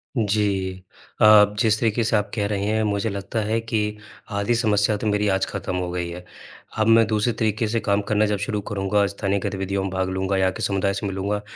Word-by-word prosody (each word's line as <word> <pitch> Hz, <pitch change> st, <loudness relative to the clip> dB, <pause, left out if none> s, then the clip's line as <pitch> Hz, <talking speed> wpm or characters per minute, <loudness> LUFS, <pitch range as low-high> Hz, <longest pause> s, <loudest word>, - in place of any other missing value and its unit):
जी। 100 Hz, -4 st, 0 dB, 0.5 s
अ, 105 Hz, -1 st, +8 dB
जिस 110 Hz, -3 st, +2 dB
तरीके 115 Hz, 0 st, +1 dB
से 110 Hz, -, +1 dB
आप 105 Hz, -1 st, 0 dB
कह 105 Hz, -2 st, 0 dB
रहे 100 Hz, -1 st, -2 dB
हैं 110 Hz, +1 st, +1 dB
मुझे 100 Hz, +1 st, -1 dB
लगता 100 Hz, +3 st, -4 dB
है 110 Hz, +2 st, 0 dB
कि 115 Hz, -1 st, -1 dB, 0.6 s
आधी 100 Hz, +4 st, +1 dB
समस्या 105 Hz, -2 st, +2 dB
तो 110 Hz, -, -3 dB
मेरी 105 Hz, 0 st, +1 dB
आज 95 Hz, 0 st, +1 dB
खत्म 95 Hz, -, -4 dB
हो 90 Hz, -1 st, -2 dB
गई 90 Hz, -1 st, -3 dB
है। 90 Hz, +1 st, -8 dB, 0.5 s
अब 110 Hz, 0 st, +2 dB
मैं 115 Hz, 0 st, +6 dB
दूसरे 110 Hz, +2 st, +1 dB
तरीके 110 Hz, 0 st, 0 dB
से 115 Hz, +2 st, 0 dB
काम 100 Hz, -2 st, +1 dB
करना 105 Hz, 0 st, +2 dB
जब 105 Hz, -1 st, 0 dB
शुरू 105 Hz, +1 st, -3 dB
करूँगा, 100 Hz, 0 st, 0 dB
स्थानीय 100 Hz, 0 st, -2 dB
गतिविधियों 95 Hz, 0 st, -2 dB
में 95 Hz, -, -2 dB
भाग 95 Hz, 0 st, -1 dB
लूँगा 95 Hz, +1 st, -1 dB
या 95 Hz, 0 st, +3 dB
के -, -, -8 dB
समुदाय 100 Hz, 0 st, 0 dB
से 100 Hz, +1 st, -3 dB
मिलूँगा, 100 Hz, +2 st, -2 dB
105 Hz, 220 wpm, -23 LUFS, 95-110 Hz, 0.6 s, अ